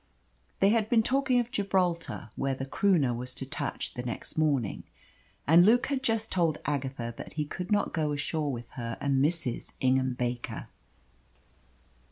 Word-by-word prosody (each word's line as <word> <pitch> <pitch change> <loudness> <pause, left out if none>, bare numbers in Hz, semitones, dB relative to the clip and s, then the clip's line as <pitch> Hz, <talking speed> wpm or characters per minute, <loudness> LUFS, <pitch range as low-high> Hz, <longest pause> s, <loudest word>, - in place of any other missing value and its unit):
They 195 - +6
had 220 -1 +2
been 225 -2 +4
talking 265 0 +3
of 240 0 -2
Gibraltar, 180 - -1
where 135 0 -1
the 135 - -4
Croonah 150 -4 +2
was 125 +1 -4
to 135 - -4
touch 140 +1 -4
the 125 - -4
next 120 -2 -5
morning, 145 -9 +1 0.6
and 165 +4 +7
Luke 230 +5 +5
had 270 -1 -1
just 225 -3 0
told 165 -4 +2
Agatha 135 -4 -2
that - - -8
he 150 -1 -1
could 180 +6 -6
not 205 - +2
go 155 -3 0
ashore 145 +1 -1
with 120 -2 -7
her 115 -2 -5
and 135 -1 +2
Mrs. 150 -6 0
Ingham 130 0 +2
Baker. 120 -1 -3
150 Hz, 165 wpm, -29 LUFS, 130-200 Hz, 0.6 s, and